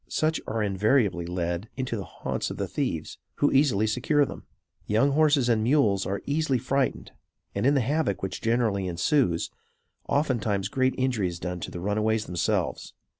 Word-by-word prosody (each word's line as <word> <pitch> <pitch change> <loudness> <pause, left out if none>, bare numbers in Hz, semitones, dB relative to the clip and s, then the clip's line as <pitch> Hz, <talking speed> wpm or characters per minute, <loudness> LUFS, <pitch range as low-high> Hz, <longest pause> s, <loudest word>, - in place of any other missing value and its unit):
Such 155 +1 0
are 110 -1 -1
invariably 100 -2 +1
led 85 +3 -3
into 130 -3 -2
the 100 - -4
haunts - - -4
of - - -6
the - - -2
thieves, - - -3 0.2
who 145 - +2
easily 130 -7 +3
secure 130 +6 +2
them. - - -9 0.4
Young 115 +7 +3
horses 145 -3 +3
and 115 -2 +3
mules 110 -6 +2
are 100 +1 -3
easily 145 -2 +1
frightened; 130 +2 -1 0.4
and, 100 +6 +1
in 145 - +4
the 135 - +3
havoc 135 - 0
which 95 - -4
generally 110 -5 +1
ensues, 90 - +1 0.6
oftentimes 115 -9 0
great 130 0 +1
injury 125 -7 +1
is 85 -1 -5
done 90 -1 -4
to - - -5
the 90 - -7
runaways 105 +3 0
themselves. 90 -1 -2
110 Hz, 170 wpm, -26 LUFS, 100-135 Hz, 0.6 s, in